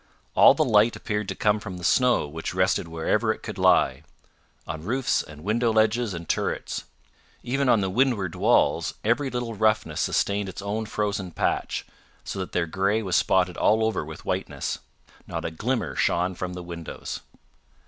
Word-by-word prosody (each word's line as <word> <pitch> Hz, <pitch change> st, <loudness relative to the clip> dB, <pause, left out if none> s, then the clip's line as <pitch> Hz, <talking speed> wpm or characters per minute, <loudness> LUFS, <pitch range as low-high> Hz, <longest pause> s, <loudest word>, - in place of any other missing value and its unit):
All -, -, +7 dB
the 155 Hz, -, +3 dB
light 110 Hz, -1 st, +4 dB
appeared 105 Hz, -2 st, -3 dB
to -, -, -3 dB
come 105 Hz, 0 st, +2 dB
from 100 Hz, -4 st, -7 dB
the 90 Hz, -, -10 dB
snow 125 Hz, -, +3 dB
which 80 Hz, +4 st, -5 dB
rested 95 Hz, -2 st, +1 dB
wherever 80 Hz, -1 st, 0 dB
it -, -, -6 dB
could -, -, -6 dB
lie 70 Hz, +2 st, +4 dB, 0.6 s
on 80 Hz, -, -5 dB
roofs 125 Hz, +9 st, 0 dB
and 75 Hz, 0 st, -12 dB
window 115 Hz, +4 st, +1 dB
ledges 110 Hz, -1 st, +2 dB
and 85 Hz, -1 st, -7 dB
turrets. -, -, -2 dB, 0.6 s
Even 135 Hz, +2 st, 0 dB
on 115 Hz, -4 st, +5 dB
the 95 Hz, -, 0 dB
windward 110 Hz, -6 st, +1 dB
walls, -, -, +2 dB
every 120 Hz, +6 st, +1 dB
little 120 Hz, -2 st, -3 dB
roughness 110 Hz, -6 st, +1 dB
sustained 100 Hz, -1 st, 0 dB
its 90 Hz, -, -8 dB
own 105 Hz, +2 st, -3 dB
frozen 105 Hz, -3 st, -2 dB
patch, 80 Hz, -, -1 dB, 0.4 s
so -, -, -5 dB
that 95 Hz, -, -4 dB
their 90 Hz, -, 0 dB
grey 100 Hz, +6 st, 0 dB
was 90 Hz, -3 st, -1 dB
spotted 90 Hz, -2 st, +2 dB
all 110 Hz, +1 st, +3 dB
over 110 Hz, -7 st, 0 dB
with 80 Hz, +1 st, -10 dB
whiteness. -, -, -2 dB, 0.5 s
Not -, -, -4 dB
a -, -, -2 dB
glimmer 105 Hz, -, -2 dB
shone 90 Hz, +2 st, +1 dB
from 90 Hz, 0 st, -5 dB
the 90 Hz, 0 st, -6 dB
windows. 85 Hz, -2 st, -6 dB
100 Hz, 175 wpm, -25 LUFS, 90-110 Hz, 0.6 s, All